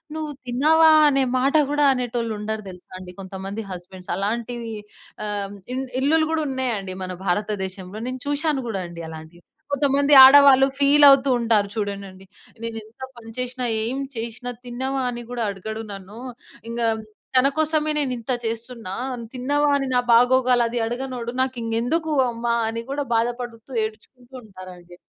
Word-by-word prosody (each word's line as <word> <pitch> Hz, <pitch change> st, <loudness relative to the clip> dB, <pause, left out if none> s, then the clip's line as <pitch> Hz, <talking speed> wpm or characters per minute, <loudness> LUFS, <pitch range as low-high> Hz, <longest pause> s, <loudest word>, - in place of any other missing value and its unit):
"నువ్వు 310 Hz, -1 st, -4 dB, 0.2 s
తిన్నావా?" 315 Hz, +6 st, +5 dB, 0.2 s
అనే 275 Hz, -1 st, +2 dB, 0.2 s
మాట 275 Hz, +4 st, +1 dB, 0.2 s
గూడా 295 Hz, 0 st, +3 dB
అనేటోళ్ళుండరు 225 Hz, -4 st, -3 dB
తెలుసా 180 Hz, 0 st, -16 dB
అండి 180 Hz, -1 st, -10 dB
కొంతమంది 195 Hz, +3 st, -6 dB
హస్బెండ్స్. 180 Hz, +1 st, -8 dB
అలాంటివీ, 230 Hz, +3 st, -3 dB, 0.5 s
ఆహ్ 205 Hz, -1 st, -4 dB, 0.2 s
ఇన్ 265 Hz, +1 st, -2 dB, 0.2 s
ఇళ్లులు 315 Hz, +3 st, +3 dB
గూడున్నయండి 260 Hz, -11 st, -2 dB
మన 185 Hz, -, -6 dB
భారతదేశంలో. 190 Hz, 0 st, -3 dB
నేను 255 Hz, -, -5 dB
చూషాను 290 Hz, -1 st, 0 dB
గూడా 210 Hz, -4 st, -3 dB
అండి 170 Hz, 0 st, -9 dB
అలాంటియి. 160 Hz, +2 st, -11 dB, 0.3 s
కొంతమంది 280 Hz, +1 st, +2 dB
ఆడవాళ్ళు 270 Hz, 0 st, +8 dB
ఫీలవుతూ 280 Hz, -1 st, +6 dB
ఉంటారు 225 Hz, -3 st, +2 dB
చూడండండి. 200 Hz, -3 st, -5 dB, 0.4 s
"నేను 230 Hz, -1 st, -4 dB
ఎంత 220 Hz, +4 st, -21 dB, 0.2 s
పని 225 Hz, -1 st, -11 dB
చేషినా, 250 Hz, 0 st, -3 dB, 0.2 s
ఏం 245 Hz, +4 st, -2 dB, 0.2 s
చేషినా, 235 Hz, +2 st, -5 dB, 0.2 s
తిన్నావా? 260 Hz, +2 st, -3 dB
అని 240 Hz, 0 st, -5 dB
గూడా 245 Hz, -1 st, -3 dB
అడగడు 220 Hz, +3 st, -6 dB
నన్ను. 195 Hz, +2 st, -11 dB, 0.5 s
ఇంగా 235 Hz, 0 st, -1 dB, 0.5 s
తన 260 Hz, +2 st, +5 dB
కోసమే 310 Hz, -1 st, +1 dB
నేనింత 255 Hz, -4 st, -2 dB
చేస్తున్నా. 230 Hz, -3 st, -5 dB, 0.4 s
తిన్నావా? 290 Hz, +3 st, +1 dB
అని 275 Hz, -1 st, -2 dB
నా 250 Hz, -, +4 dB
బాగోగలది 245 Hz, -1 st, +3 dB
అడగనోడు 245 Hz, -1 st, -4 dB
నాకింకెందుకు 255 Hz, +5 st, -1 dB, 0.2 s
అమ్మా?" 235 Hz, 0 st, -1 dB
అని 230 Hz, +1 st, -4 dB
గూడా 285 Hz, 0 st, -2 dB
బాధపడుతూ, 240 Hz, +1 st, -3 dB
ఏడ్చుకుంటూ 240 Hz, +4 st, -12 dB
ఉంటారండి. 185 Hz, -4 st, -12 dB
240 Hz, 130 wpm, -23 LUFS, 210-270 Hz, 0.5 s, ఆడవాళ్ళు